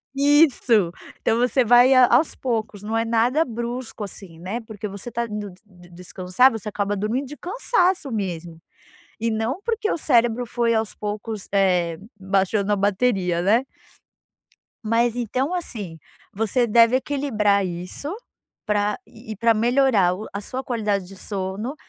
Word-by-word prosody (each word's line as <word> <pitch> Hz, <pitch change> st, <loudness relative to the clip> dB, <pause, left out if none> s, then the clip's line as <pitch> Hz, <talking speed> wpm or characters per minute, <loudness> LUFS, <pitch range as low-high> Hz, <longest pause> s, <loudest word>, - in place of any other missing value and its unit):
Isso. 275 Hz, -, +4 dB, 0.3 s
Então 225 Hz, -, +1 dB
você 250 Hz, +1 st, +2 dB
vai 245 Hz, +3 st, +6 dB
a 255 Hz, -1 st, +7 dB
aos 265 Hz, +7 st, +3 dB
poucos, 220 Hz, -5 st, -3 dB
não 220 Hz, +2 st, -2 dB
é 225 Hz, -, 0 dB
nada 235 Hz, +7 st, +2 dB
brusco, 235 Hz, -1 st, -5 dB
assim, 190 Hz, -4 st, -10 dB
né. 190 Hz, +7 st, -4 dB
Porque 215 Hz, -2 st, -7 dB
você 200 Hz, +4 st, -8 dB
está 235 Hz, 0 st, -2 dB
indo 210 Hz, -2 st, -6 dB
d 180 Hz, -, -20 dB
d 180 Hz, -3 st, -18 dB
descansar, 180 Hz, +7 st, +1 dB
você 225 Hz, -1 st, -6 dB
acaba 205 Hz, 0 st, -2 dB
dormindo 230 Hz, +7 st, -2 dB
de 295 Hz, +3 st, -9 dB
cansaço 370 Hz, -, 0 dB
mesmo, 175 Hz, -6 st, -4 dB, 0.6 s
e 230 Hz, +1 st, 0 dB
não 225 Hz, -, -2 dB
porque 450 Hz, -2 st, -1 dB
o -, -, 0 dB
cérebro 240 Hz, -5 st, +2 dB
foi 235 Hz, 0 st, 0 dB
aos 220 Hz, -1 st, -1 dB
poucos, 210 Hz, 0 st, -5 dB
eh, 180 Hz, -4 st, +2 dB, 0.2 s
baixando 195 Hz, +2 st, 0 dB
a -, -, +3 dB
bateria, 195 Hz, -3 st, +1 dB
né. 220 Hz, +8 st, +3 dB, 1.2 s
Mas 230 Hz, +1 st, +1 dB
então, 255 Hz, -, -1 dB
assim, 210 Hz, -, -5 dB, 0.4 s
você 225 Hz, +4 st, +1 dB
deve 230 Hz, +2 st, +5 dB
equilibrar 220 Hz, -8 st, 0 dB
isso 180 Hz, -, -5 dB, 0.5 s
pra 210 Hz, 0 st, 0 dB
e 220 Hz, -1 st, -10 dB
pra 230 Hz, +3 st, +3 dB
melhorar 230 Hz, -5 st, +3 dB
o 210 Hz, +4 st, -7 dB
a 200 Hz, -, -4 dB
sua 255 Hz, +5 st, -5 dB
qualidade 210 Hz, -6 st, -1 dB
de 195 Hz, +2 st, -12 dB
sono, 200 Hz, +7 st, -4 dB
220 Hz, 155 wpm, -23 LUFS, 200-250 Hz, 1.2 s, a